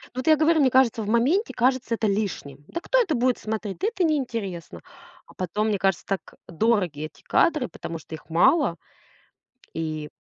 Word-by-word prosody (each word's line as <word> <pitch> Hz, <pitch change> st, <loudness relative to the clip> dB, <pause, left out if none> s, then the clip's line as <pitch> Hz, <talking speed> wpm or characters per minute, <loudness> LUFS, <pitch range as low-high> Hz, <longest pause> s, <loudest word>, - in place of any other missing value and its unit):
вот 255 Hz, +3 st, -4 dB
я 315 Hz, -, +7 dB
говорю, 315 Hz, +1 st, +3 dB
мне 265 Hz, -, +5 dB
кажется, 255 Hz, -3 st, +3 dB
в 210 Hz, -, -5 dB
моменте 275 Hz, -, +2 dB
кажется 255 Hz, -1 st, +1 dB
это 225 Hz, -, -2 dB
лишним. 195 Hz, -9 st, -3 dB
Да 340 Hz, -, -5 dB
кто -, -, +2 dB
это 360 Hz, -10 st, 0 dB
будет 250 Hz, 0 st, +1 dB
смотреть? 215 Hz, -2 st, -4 dB
Да 400 Hz, -, 0 dB
это 440 Hz, -5 st, -1 dB
неинтересно. 225 Hz, -, -2 dB, 0.4 s
А -, -, -18 dB
потом, 195 Hz, +4 st, -2 dB
мне 205 Hz, -2 st, 0 dB
кажется, 190 Hz, -3 st, 0 dB
так, 195 Hz, -1 st, -2 dB, 0.3 s
э, -, -, -11 dB
дороги 180 Hz, -6 st, +1 dB
эти 155 Hz, -, -13 dB
кадры, 305 Hz, -6 st, +2 dB
потому 165 Hz, -1 st, -7 dB
что 160 Hz, -, -13 dB
их 155 Hz, -, -9 dB
мало. 255 Hz, -, +3 dB, 1.0 s
И 155 Hz, -2 st, -4 dB
220 Hz, 190 wpm, -24 LUFS, 175-270 Hz, 1.0 s, я